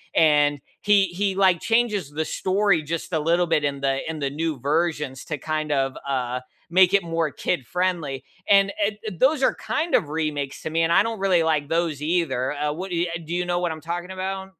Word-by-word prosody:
and 145 -2 +4 0.2
he 205 -2 +4
he 190 +2 -1
like 185 -3 +4
changes 225 -9 +1
the 155 +2 -2
story 190 -2 +1
just 165 +3 -4
a 160 - +2
little 170 +3 +2
bit 160 -2 +1
in 140 -1 -2
the 135 0 +1
in 160 - -4
the 140 -1 -1
new 155 +1 -2
versions 150 -2 -1
to 150 - -4
kind 155 +1 -3
of, 135 -1 0
uh, 125 -2 -1 0.3
make 185 +2 +5
it 200 -2 +4
more 165 -1 -1
kid-friendly, 165 -2 -2 0.3
and 200 0 +5
eh 205 - +1 0.3
those 280 +1 +3
are - - +4
kind 335 +3 -1
of - - +2
remakes 150 -3 -3
to - - -4
me, 165 +1 +1
and 165 +1 +2
I - - +5
don't 225 -2 -4
really 185 -4 +3
like 155 -3 +1
those 165 -3 0
either. 150 -5 0
Uh, 150 0 -1
what 185 +4 -6
eh 170 +1 +1
ya 170 - -5
do 165 - -5
you 180 0 0
know 175 0 0
what 175 -2 -1
I'm 155 - -10
talking 175 +2 -5
about? 190 0 -4
165 Hz, 215 wpm, -24 LUFS, 150-185 Hz, 0.3 s, make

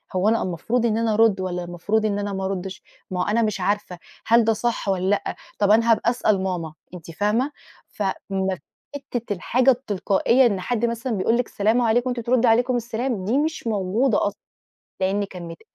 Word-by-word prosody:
هو 185 +3 +3
أنا 230 - +2
المفروض 220 +7 -1
إن 220 -2 +1
أنا 225 -1 +1
أرُد، 210 -3 +3
والّا 180 -1 -3
المفروض 185 +6 -1
إن 205 -1 0
أنا 205 0 -3
ما 190 0 -3
أردِّش 190 0 -4 0.3
ما 180 - -2
هو - - 0
أنا 220 +3 +2
مش 215 -4 -1
عارفة 185 -2 -1 0.3
هل 230 +1 +5
ده 225 - +3
صح 235 -2 -2
والّا 190 0 0
لأ 205 - 0 0.2
طَب 205 0 +3
أنا 230 +2 +5
هابقى 230 +1 +3
أسأل 215 -5 +1
ماما 175 -4 -3 0.2
أنتِ 170 -2 -9
فاهمة؟ 210 - 0 0.4
ف 210 - -5 0.3
ما 190 -3 -1 0.4
حتّة 245 -6 -4
الحاجة 250 +8 +3
التلقائيّة 235 +1 +2
إن 200 -5 +1
حد 235 +3 0
مثلًا 235 +1 -2
بيقول 225 +4 +1
لِك 245 - -1
سلام 220 +4 +1
عليكم 240 +2 +2
وأنتِ 245 -1 -2
تردّي 250 0 +3
عليكم 245 +3 +3
السلام 235 -3 -2
دي 235 +7 +1
مش 310 -4 -1
موجودة 210 +3 +1
أصلًا، 205 - -6 0.6
لإن 195 +2 +1
كان 180 -3 -9
متقفّل 165 -1 -11
215 Hz, 200 wpm, -23 LUFS, 190-235 Hz, 0.6 s, هل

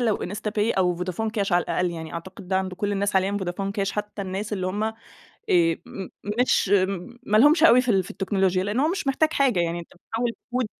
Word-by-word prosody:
لو 225 -4 +2
IntsaPay 210 +2 -1
أو 180 -1 +3
فودافون 185 +5 -2
كاش 200 -3 -1
على 175 0 +4
الأقل، 180 -1 -1
يعني 160 -1 -7
أعتقد 185 +2 -8
ده 190 - +1
عند 185 -1 -3
كل 205 +2 -2
الناس 200 0 0
حاليًا 190 +1 +3
فودافون 195 +1 -3
كاش 200 -1 -1
حتى 210 -1 -4
الناس 195 +3 -4
اللي 185 -2 -1
هم، 205 +3 -2
آآ 220 0 -2 0.5
م 170 +2 +1 0.3
مش 250 - +3 0.6
ما 210 - +2
لهُمش 305 +6 +6
أوي 255 -6 +8
في 250 - -5
ال 190 -2 +3
في - - -11
التكنولوجيا. 190 -1 0
لأن 210 +6 0
هو 305 - +3
مش 350 -5 -2
محتاج 310 +4 +2
حاجة 255 -10 +2
يعني 170 0 -1
أنت 170 - -12
بتحوِّل 230 +6 -3 0.2
كود 250 -1 0
200 Hz, 215 wpm, -24 LUFS, 185-220 Hz, 0.6 s, أوي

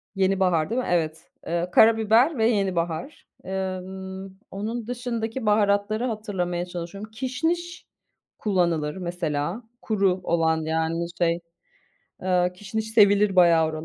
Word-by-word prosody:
yenibahar 190 -4 +2
değil 245 +3 0
mi? - - -5
Evet, 160 -2 -1
evet, 170 +1 -2
karabiber 225 +6 +5
ve 220 - +2
yenibahar. 185 - -1 0.2
Emm, 190 0 -5 0.2
onun 220 +3 -4
dışındaki 240 -1 -3
baharatları 210 +2 +2
hatırlamaya 190 -6 -2
çalışıyorum, 180 +4 -7
kişniş 320 +9 -3 0.5
kullanılır 170 -6 0
mesela, 175 +2 -3 0.2
kuru 195 -4 +1
olan, 160 -2 +1
yani, 160 +1 -1
şey, 170 -1 +1 0.8
eee, 180 -1 +2
kişniş 220 +3 -4
sevilir 205 -2 +4
bayağı 170 -3 +6
oralarda, 155 0 -5
190 Hz, 115 wpm, -25 LUFS, 175-220 Hz, 0.8 s, bayağı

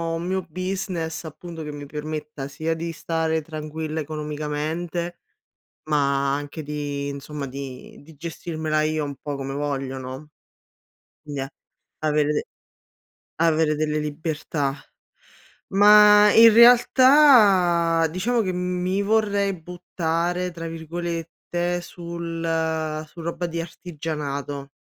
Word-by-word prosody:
un 165 +1 -4
mio 190 +1 0
business 180 -2 -3
appunto 165 +1 -8
che 150 - -5
mi 145 -1 -8
permetta 150 -1 -5
sia 160 +3 -2
di 165 +1 -4
stare 160 -1 -1
tranquilla 155 0 -5
economicamente, 155 +3 -4 0.6
ma 140 -2 +1
anche 145 +2 -6
di 145 -1 -4
insomma, 140 +1 -6
di 135 -1 -8
di 160 +2 -16
gestirmela 155 0 -3
io 155 0 0
un 140 -1 -5
po' 145 +1 -5
come 135 0 -5
voglio 135 -2 -3
no. 130 +3 -8 1.0
Quindi 145 -2 -5
è 135 - -3 0.6
avere 150 -1 +1 0.9
avere 160 -1 +2
delle 150 0 0
libertà. 150 -2 -2 0.9
Ma 210 +1 +7
in 230 0 +9
realtà, 225 - +6
diciamo 230 +8 0
che 185 -3 -1
mi 180 +1 -1
vorrei 200 -2 +1
"buttare" 175 +1 -2
tra 165 0 -6
virgolette 170 +1 -3
sul 165 -2 -3
su 170 - -12
roba 170 +1 -3
di 170 0 -4
artigianato, 150 -4 -5
160 Hz, 110 wpm, -24 LUFS, 150-175 Hz, 1.0 s, in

